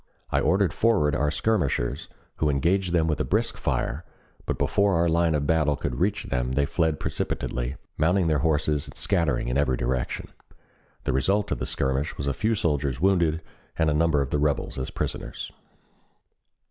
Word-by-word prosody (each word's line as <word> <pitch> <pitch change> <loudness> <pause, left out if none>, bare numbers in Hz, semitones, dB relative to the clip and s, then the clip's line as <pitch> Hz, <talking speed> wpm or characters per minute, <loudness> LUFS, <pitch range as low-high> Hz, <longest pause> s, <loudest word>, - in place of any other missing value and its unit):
I - - +3
ordered 95 -1 +2
forward 105 -11 +2
our 75 +2 +1
skirmishers, 75 - 0 0.3
who 75 - +1
engaged 85 +7 +1
them 85 -2 +3
with 75 -3 0
a - - +2
brisk - - 0
fire, 80 - -2 0.4
but - - -1
before 100 -2 +2
our 85 +1 +3
line 85 -1 +2
of 70 -1 0
battle 75 -1 +2
could 65 -3 -4
reach - - +1
them 60 +1 -2
they 70 +1 +2
fled 80 -1 0
precipitately, 60 +1 -3 0.2
mounting 90 +4 +3
their 80 -2 +2
horses 75 -2 +1
and - - -11
scattering 85 -12 +1
in 60 +3 +1
every 65 -3 +1
direction. - - -2 0.7
The - - 0
result 95 +10 +1
of - - -1
the - - -3
skirmish 65 +3 -1
was 70 - -3
a 70 - 0
few 110 +1 0
soldiers 75 - 0
wounded 85 -4 +2 0.3
and 80 -2 +2
a - - +2
number 75 -2 +2
of 70 - -7
the 75 - +1
rebels 75 -2 0
as 65 - -3
prisoners. - - -4
75 Hz, 180 wpm, -26 LUFS, 70-85 Hz, 0.7 s, I